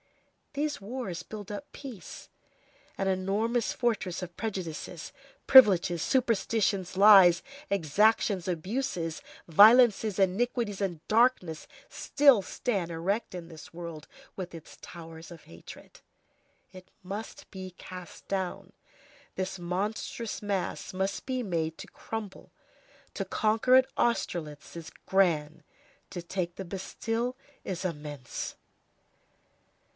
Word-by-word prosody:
These 290 -4 -2
wars 200 -5 -5
build 210 0 -9
up 210 +8 -7
peace. 255 -9 -9 0.7
An 195 - -1
enormous 205 +5 0
fortress 210 -8 -1
of 175 -1 -8
prejudices, 180 -6 -5 0.3
privileges, 185 - +7
superstitions, 215 -6 +1
lies, 195 -4 +8 0.3
exactions, 200 +2 +2
abuses, 180 -2 -2 0.3
violences, 215 +3 +6
iniquities, 205 +2 0
and 175 -5 -3
darkness 215 -8 +2 0.2
still 280 -7 +4
stands 195 -4 -2
erect 190 +8 -2
in 170 -2 -7
this 160 -1 -12
world, 170 -3 -8 0.3
with 180 -3 -6
its 165 - -11
towers 165 -1 -10
of 170 -2 -12
hatred. 85 0 -13 0.7
It 185 0 -13
must 200 +4 -7
be 185 -2 -8
cast 180 -1 -10
down. 190 -2 -3 0.6
This 190 0 -3
monstrous 205 +5 -3
mass 200 -3 -3
must 190 +5 -2
be 255 -1 -1
made 160 -5 -2
to - - -9
crumble. 215 -4 -7 0.6
To - - -2
conquer 225 +4 +2
at 260 0 +6
Austerlitz 170 -12 -2
is 165 -2 -8
grand; 165 -5 +1 0.5
to 175 - -6
take 175 -1 -3
the 190 - -6
Bastille 225 +6 -3 0.3
is 185 0 -4
immense. 150 -6 -5
190 Hz, 110 wpm, -29 LUFS, 170-220 Hz, 0.7 s, lies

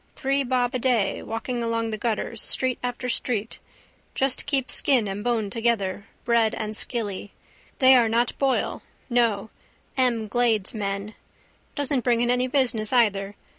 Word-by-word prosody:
Three 275 0 0
bob 250 0 0
a 255 - -1
day, 235 -6 +1
walking 235 +2 -4
along 230 -1 -1
the 215 - -2
gutters, 230 0 -2
street 255 -2 +1
after 245 0 -3
street. 230 -3 -2 0.6
Just 270 +1 +1
keep 275 -2 0
skin 255 -7 +2
and 195 +1 -4
bone 225 -4 0
together, 215 -4 -1 0.2
bread 230 -2 +3
and 215 0 -3
skilly. 205 -4 -3 0.4
They 260 0 +7
are 235 -3 +4
not 235 +1 +1
Boyl: 270 -2 0 0.3
no, 225 -4 +1 0.4
M'Glade's 235 -4 +1
men. 200 0 -3 0.6
Doesn't 285 -3 0
bring 240 -2 +2
in 240 0 +2
any 250 +1 +1
business 250 -5 +1
either. 205 -5 +2
235 Hz, 145 wpm, -25 LUFS, 215-250 Hz, 0.6 s, They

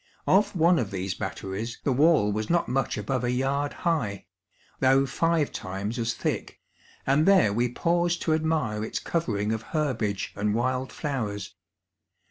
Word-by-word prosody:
Of 205 +1 +3
one 170 0 +4
of 105 - -1
these 95 -1 -3
Batteries, 95 +4 -5
the 135 - +1
wall 145 -6 +4
was 105 +1 -2
not 170 0 +2
much 130 -2 -1
above 125 +5 -2
a 120 - 0
yard 135 +3 0
high, 125 - 0 0.5
though 135 +1 +4
five 165 +2 +1
times 100 +5 -4
as 115 0 -1
tliick, - - -2 0.5
and 145 +5 +3
there 185 - +5
we 120 +3 +1
paused 175 +4 +1
to 160 - +2
admire 155 -10 0
its 110 - -3
covering 110 -11 -1
of 110 0 -2
Iierbage 115 - -2
and 105 +1 0
wild 130 +2 -1
flowers. 110 - -4
125 Hz, 155 wpm, -26 LUFS, 105-155 Hz, 0.5 s, there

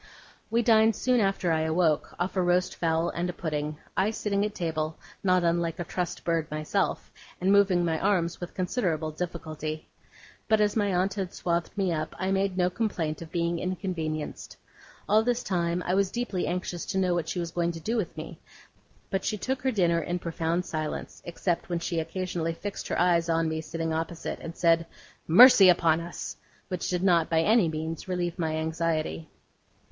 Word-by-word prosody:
We 235 +1 +2
dined 220 -1 +5
soon 250 -1 +2
after 195 -4 +1
I 160 -1 +2
awoke, 160 -1 +1
off 180 +3 -1
a 185 - +2
roast 180 0 +1
fowl 165 0 +1
and 175 +1 -2
a - - -3
pudding; 150 -3 -3 0.2
I 195 +3 +2
sitting 205 -2 -1
at 210 0 -2
table, 160 -2 -2 0.3
not 185 -2 +3
unlike 170 -1 +1
a 175 - -2
trussed 175 +1 -3
bird 165 -2 0
myself, 155 0 -1 0.3
and 185 +2 +2
moving 195 -3 +4
my 160 -1 0
arms 180 -4 0
with 175 - -7
considerable 175 -5 -1
difficulty. 155 -2 -5 0.6
But 220 -1 +4
as 210 -1 +2
my 205 -3 +1
aunt 185 +2 +1
had 190 -3 -4
swathed 170 +3 -2
me 190 -3 +1
up, 155 -1 -3
I 190 +1 -1
made 195 -1 0
no 180 0 +2
complaint 175 -7 -2
of 165 -1 -9
being 170 0 0
inconvenienced. 170 -4 -4 0.5
All 215 +2 +5
this 245 +1 0
time 175 -1 0
I 180 - 0
was 195 0 +2
deeply 235 -6 -2
anxious 175 -1 -3
to 190 - -2
know 185 -2 +2
what 170 -2 -1
she - - -3
was 170 -1 -3
going 170 0 0
to 165 - -7
do 220 +8 -2
with 215 -7 -2
me; - - -7 0.7
but 195 -1 -1
she 215 - -1
took 260 +5 -2
her 260 0 +1
dinner 175 -6 +2
in 175 +2 -2
profound 170 +1 -2
silence, 155 -1 -4
except 175 +1 -2
when 175 - 0
she 170 0 -2
occasionally 170 -1 -2
fixed 205 +3 -5
her - - -1
eyes 170 -1 +3
on 165 0 +2
me 160 0 -2
sitting 165 0 -3
opposite, 165 +1 -3
and 165 - -8
said, 165 -1 +3 0.4
'Mercy 200 +1 +9
upon 165 -2 +4
us!' 170 +1 -6 0.3
which 180 -2 -3
did 180 0 -1
not 170 -4 +3
by 160 -1 +3
any 210 -1 +4
means 160 +2 -4
relieve 180 -1 -2
my 160 -2 0
anxiety. 160 - -2
175 Hz, 190 wpm, -27 LUFS, 165-190 Hz, 0.7 s, Mercy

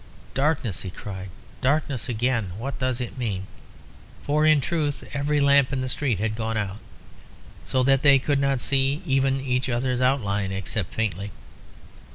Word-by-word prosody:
"Darkness!" 135 - 0
he 95 - -5
cried 95 0 -7 0.3
"darkness 140 -2 0
again! 115 -5 0
What 135 +5 -5
does 130 -2 0
it 125 +1 -5
mean?" 100 -6 -2 0.8
For 150 +2 +2
in 155 -1 +6
truth 150 -1 -1
every 145 +1 +1
lamp 140 -1 +5
in 135 -2 -1
the 130 - -2
street 130 -5 0
had 105 +3 -1
gone 110 0 -2
out, 100 -1 -3 0.9
so 130 -1 +1
that 135 0 +4
they 140 -1 +7
could 140 +1 +1
not 140 -2 +1
see 140 +4 +1
even 135 -2 +2
each 130 -1 -1
other's 125 +1 0
outline, 105 -7 +1
except 95 0 -3
faintly. 105 -2 -2
130 Hz, 160 wpm, -25 LUFS, 110-140 Hz, 0.9 s, they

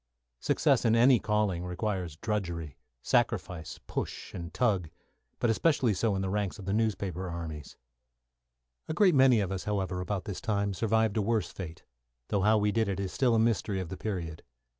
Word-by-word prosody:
Success - - +2
in 115 0 +4
any 120 +1 +6
calling 105 -5 0
means 90 -3 -3
drudgery, 85 - -3 0.3
sacrifice, 80 -4 0
push, - - -5
and 85 -1 -6
tug, 100 -10 +1 0.5
but 120 - +2
especially 130 -2 +2
so 100 +2 0
in 95 - -1
the 95 - -1
ranks 105 0 -1
of 100 - -9
the 95 - -1
newspaper 100 -5 -1
armies. 80 -3 -6 1.1
A 155 - -3
great 190 -2 +5
many 130 -5 +5
of 95 -2 -2
us, 95 -1 -4
however, 95 -3 -1
about 95 0 -3
this 100 - -5
time, 100 -4 0
survived 110 +1 +1
a - - +3
worse 110 +1 0
fate, 80 -4 -8 0.5
though 100 - +1
how 110 +3 +4
we 105 0 +2
did 110 0 +1
it 100 -1 -2
is 95 -2 -3
still 125 -3 +3
a - - +3
mystery 110 -3 +1
of 90 -3 -4
the 95 - -5
period. 90 -7 -4
100 Hz, 185 wpm, -29 LUFS, 90-110 Hz, 1.1 s, any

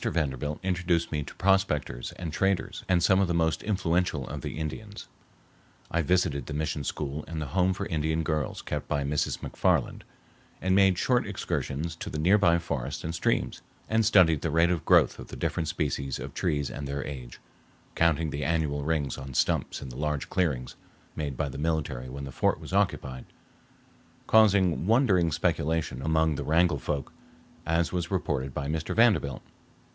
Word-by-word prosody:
Vanderbilt 75 -2 -1
introduced 90 -2 0
me 75 - -1
to - - -8
prospectors 95 -10 +1
and 85 -4 -6
traders 95 0 0
and 90 -2 +3
some 95 +1 +5
of 100 - +3
the 85 - 0
most 80 -2 +1
influential 90 -7 0
of - - -5
the - - -5
Indians. 100 +7 -6 0.8
I 85 - +2
visited 80 -4 +1
the 75 - -4
mission 75 -1 -2
school 75 +2 -3
and 80 -1 -5
the 75 - -3
home 95 0 +3
for 100 - -3
Indian 80 0 0
girls 75 -3 -2
kept - - -4
by 70 -1 0
Mrs. 70 +1 -1
MacFarland, - - 0 0.6
and 95 +1 +1
made 95 -2 +5
short 125 +3 +2
excursions 80 +5 -3
to - - -6
the - - -4
nearby 85 +1 +4
forests 70 -7 -4
and 80 - -3
streams, 85 - 0 0.3
and 110 0 +2
studied 90 -8 +5
the 85 - -1
rate 85 +3 +3
of 85 -3 -2
growth - - +4
of - - -8
the - - -9
different 80 - -2
species 75 -5 -2
of - - -7
trees 75 -6 -1
and 70 - -5
their 70 0 -3
age, 65 -5 -8 0.5
counting 80 -2 +2
the 75 +1 -3
annual 75 -1 0
rings 75 -4 -1
on 65 -1 -8
stumps - - 0
in 65 - -7
the 60 - -9
large 75 -1 -2
clearings 70 -9 -1 0.4
made 70 -4 -3
by - - 0
the 70 - -7
military 75 -5 -2
when 70 +2 -7
the 70 - -6
fort - - +1
was - - -9
occupied, 65 -2 0 1.0
causing 100 -6 +4
wondering 105 -8 +4
speculation 75 -3 0
among 80 +1 +2
the - - -3
Wrangell 80 -1 +3
folk, 70 -2 -3 0.5
as 85 0 +1
was 85 -1 -1
reported 75 -8 -1
by 70 +1 -4
Mr. 80 +1 -2
Vanderbilt. 105 - +3
80 Hz, 175 wpm, -28 LUFS, 70-90 Hz, 1.0 s, some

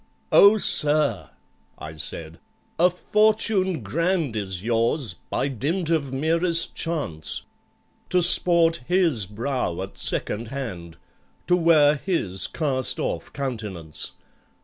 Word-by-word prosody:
"Oh, 205 +2 +7
sir," 150 - +1 0.5
I 80 0 -9
said, 80 +1 -8 0.4
"a 180 +2 +5
fortune 200 - +1
grand 165 - -1
Is 95 -3 -3
yours, 115 - 0 0.2
by - - -1
dint 155 - -2
of 145 -5 0
merest 165 +5 +2
chance,— 145 - -2 0.7
To 180 -1 +2
sport 170 -2 +4
his 165 - +1
brow 110 -4 -3
at 95 - -10
second 115 +2 -2
hand, 95 -11 -7 0.5
To 180 - +3
wear 155 -4 +4
his 100 - -1
cast 135 -5 -1
off - - -4
countenance! 105 - -5
140 Hz, 110 wpm, -23 LUFS, 105-170 Hz, 0.7 s, Oh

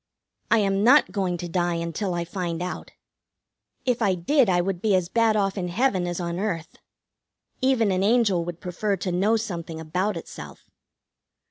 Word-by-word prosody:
I 230 - +5
am 200 -1 +1
not 255 -3 +5
going 185 -3 -1
to 175 - -5
die 175 0 0
until 170 +3 -3
I 170 0 -2
find 175 -2 -4
out. 180 - -6 1.0
If 250 -2 0
I 195 -4 +2
did 235 - +2
I 175 -1 +3
would 180 0 -2
be 210 -3 +3
as 180 -2 0
bad 225 0 +2
off 200 -1 0
in 180 - -2
heaven 185 -2 +1
as 175 0 -3
on 170 0 -3
earth. 180 -6 -3 0.8
Even 255 -6 +2
an 185 0 0
angel 205 -4 +3
would 175 0 -6
prefer 195 +3 -2
to 180 +1 -3
know 200 +6 +2
something 170 -7 -5
about 180 +5 -2
itself. 75 - -10
185 Hz, 175 wpm, -25 LUFS, 175-215 Hz, 1.0 s, I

